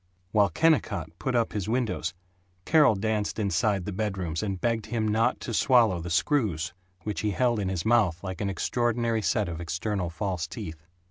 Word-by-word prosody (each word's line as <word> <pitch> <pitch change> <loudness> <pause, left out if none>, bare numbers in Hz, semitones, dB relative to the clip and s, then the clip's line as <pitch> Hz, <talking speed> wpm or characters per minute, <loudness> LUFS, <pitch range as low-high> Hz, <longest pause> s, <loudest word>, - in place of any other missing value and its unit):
While 105 -3 +4
Kennicott 100 - +1
put 130 -2 -1
up 115 -1 +1
his 105 -1 -3
windows 120 -6 -1 0.5
Carol 150 -8 +5
danced 105 +1 -1
inside 100 -1 +1
the 105 - -3
bedrooms 95 -5 -2
and 100 -3 -3
begged 115 -1 -1
him 110 -1 -1
not 110 +2 +2
to 120 - -4
swallow 115 -7 +4
the 85 - -5
screws, 85 - +1 0.3
which 105 -5 -3
he 105 - 0
held 120 +2 +1
in 95 -2 -1
his 90 -3 -3
mouth 105 -7 +2
like 95 0 -5
an 100 - 0
extraordinary 115 +3 0
set 100 +3 +1
of 85 -1 -5
external 90 +2 -2
false 90 -1 -3
teeth. 80 0 -8
105 Hz, 180 wpm, -27 LUFS, 90-115 Hz, 0.5 s, Carol